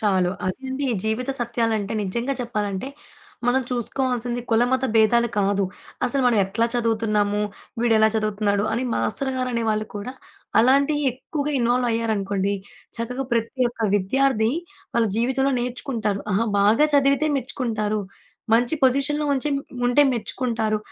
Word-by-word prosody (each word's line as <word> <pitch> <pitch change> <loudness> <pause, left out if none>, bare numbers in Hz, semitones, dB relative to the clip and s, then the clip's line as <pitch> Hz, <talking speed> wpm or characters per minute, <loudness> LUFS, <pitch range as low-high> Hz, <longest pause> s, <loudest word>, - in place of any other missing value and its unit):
చాలు. 190 -4 +2 0.2
అదెండి. 265 +7 -3 0.2
జీవిత 220 +4 -1
సత్యాలంటే 225 -3 -1
నిజంగా 235 +8 -2
చెప్పాలంటే, 210 -1 -3 0.6
మనం 260 +2 +3
చూసుకోవాల్సింది 245 0 -1
కులమత 245 +3 +2
భేదాలు 235 +2 +4
కాదు. 200 0 +2 0.4
అసలు 265 +2 +1
మనం 235 -3 +3
ఎట్లా 200 +5 0
చదువుతున్నాము, 215 -3 +1 0.4
వీడేలా 220 -2 +4
చదువుతున్నాడు, 205 -1 0
అని 235 - 0
మాస్టర్ 265 +5 0
గారనే 250 -2 -1
వాళ్ళు 215 0 -1
కూడా, 205 +5 -5 0.5
అలాంటియి 280 +4 +3
ఎక్కువగా 290 +3 -4
ఇన్వాల్వయ్యారనుకోండి. 225 -5 0 0.4
చక్కగా 250 +3 -3
ప్రతి 235 +2 0
ఒక్క 225 -2 -2
విద్యార్థి, 225 +2 +2 0.4
వాళ్ళ 235 -1 +3
జీవితంలో 265 +4 +1
నేర్చుకుంటారు. 240 -5 -2
ఆహ! 195 - +2 0.2
బాగా 220 +9 +5
చదివితే 280 +1 +3
మెచ్చుకుంటారు. 225 -5 -2 0.5
మంచి 240 +6 +2
పొజిషన్‌లో 280 +3 +2
ఉంచే 275 +3 -1 0.4
ఉంటే 245 +4 +5
మెచ్చుకుంటారు. 230 -2 -1
235 Hz, 120 wpm, -23 LUFS, 215-260 Hz, 0.6 s, బాగా